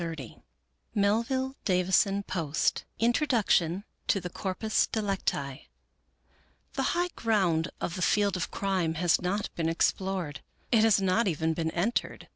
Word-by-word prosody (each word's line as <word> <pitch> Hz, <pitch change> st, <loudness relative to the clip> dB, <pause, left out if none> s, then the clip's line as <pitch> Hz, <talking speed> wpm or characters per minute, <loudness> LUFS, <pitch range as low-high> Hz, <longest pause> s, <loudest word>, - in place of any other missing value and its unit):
64 160 Hz, -8 st, -7 dB, 0.5 s
Melville 235 Hz, +6 st, +1 dB
Davisson 190 Hz, +1 st, +2 dB
Post 160 Hz, -4 st, -1 dB
Introduction 225 Hz, -, +2 dB, 0.2 s
to 195 Hz, -, +3 dB
The 180 Hz, -1 st, -6 dB
Corpus 195 Hz, +5 st, 0 dB
Delicti 190 Hz, -, -2 dB, 1.1 s
The -, -, -1 dB, 0.2 s
high 355 Hz, +1 st, +1 dB
ground 185 Hz, -7 st, +1 dB
of 170 Hz, -, -3 dB
the 185 Hz, -, -5 dB
field 200 Hz, 0 st, +2 dB
of 180 Hz, -, -2 dB
crime 185 Hz, -5 st, -1 dB
has 170 Hz, +1 st, +2 dB
not 195 Hz, +3 st, -2 dB
been 165 Hz, -1 st, 0 dB
explored; 180 Hz, -2 st, -1 dB, 0.3 s
it 225 Hz, -3 st, +5 dB
has 220 Hz, -3 st, +5 dB
not 195 Hz, +3 st, +2 dB
even 160 Hz, -1 st, 0 dB
been 160 Hz, 0 st, -1 dB
entered. 185 Hz, +9 st, -2 dB
190 Hz, 130 wpm, -29 LUFS, 165-215 Hz, 1.1 s, it